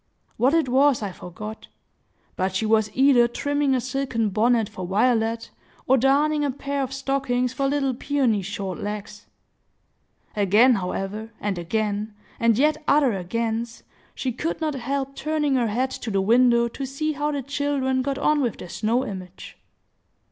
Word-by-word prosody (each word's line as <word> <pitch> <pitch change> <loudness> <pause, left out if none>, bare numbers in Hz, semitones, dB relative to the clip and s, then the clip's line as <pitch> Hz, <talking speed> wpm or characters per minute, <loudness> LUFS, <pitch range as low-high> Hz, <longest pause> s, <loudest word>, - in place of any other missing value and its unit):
What 260 +7 +3
it 325 -4 +2
was 265 -1 +3
I 200 - -3
forget; 210 +5 -9 0.7
but 185 0 -1
she 220 - 0
was 220 -1 +2
either 260 -3 +5
trimming 285 +2 0
a - - +1
silken 255 -3 -1
bonnet 225 +2 +2
for 185 -2 -7
Violet, 225 +3 +1 0.3
or 265 - +4
darning 290 +4 +2
a 290 - +1
pair 280 +1 -3
of 265 -1 -3
stockings 270 -2 -1
for 275 +1 0
little 275 -1 0
Peony's 240 -7 0
short 195 -3 -4
legs. 205 0 -6 1.1
Again, 210 +5 +5
however, 195 +2 -3
and 200 -3 -2
again, 210 +3 -2 0.2
and 230 -2 +3
yet 305 +3 +2
other 280 -4 +4
agains, 225 +5 -3 0.3
she 260 - -2
could 300 +7 -3
not 310 -2 -1
help 275 +1 -3
turning 305 -2 0
her 245 -3 +2
head 250 +5 -1
to 235 - -5
the 195 -2 +1
window 235 +3 +4
to 275 - -7
see 310 +4 -2
how 295 0 -1
the 285 -2 -3
children 280 -1 0
got 275 +1 -2
on 295 +1 +2
with 240 -6 -1
their 180 - -9
snow 230 +7 0
image. 185 -3 -8
245 Hz, 160 wpm, -24 LUFS, 215-275 Hz, 1.1 s, either